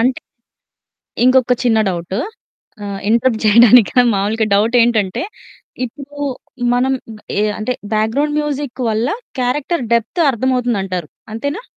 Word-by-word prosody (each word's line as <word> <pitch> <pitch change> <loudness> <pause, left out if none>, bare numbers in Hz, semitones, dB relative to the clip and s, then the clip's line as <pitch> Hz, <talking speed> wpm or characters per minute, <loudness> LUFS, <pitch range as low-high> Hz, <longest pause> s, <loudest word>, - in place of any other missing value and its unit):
అంటే 255 +3 +1 1.0
ఇంకొక 255 -1 +4
చిన్న 225 -2 +3
డౌటు 175 +3 -4 0.7
ఆహ్, 200 -1 -5
ఇంటరప్ట్ 230 0 +2
చేయడానికి 230 +1 +6 0.2
మాములుగా 215 +3 0
డౌటెంటంటే 225 -2 +2 0.6
ఇప్పుడు 285 +3 -10 0.6
మనం 255 +2 +1 0.5
ఎ - - +2 0.2
అంటే 215 +4 -2 0.2
బ్యాక్‌గ్రౌండ్ 250 +8 0
మ్యూజిక్ 285 -3 -4
వల్ల 220 +4 0 0.3
క్యారెక్టర్ 270 +5 -1
డెప్తు 235 +9 0
అర్థమవుతుదంటారు 230 - -1 0.2
అంతేనా? 285 - -4
235 Hz, 100 wpm, -17 LUFS, 215-260 Hz, 1.0 s, చేయడానికి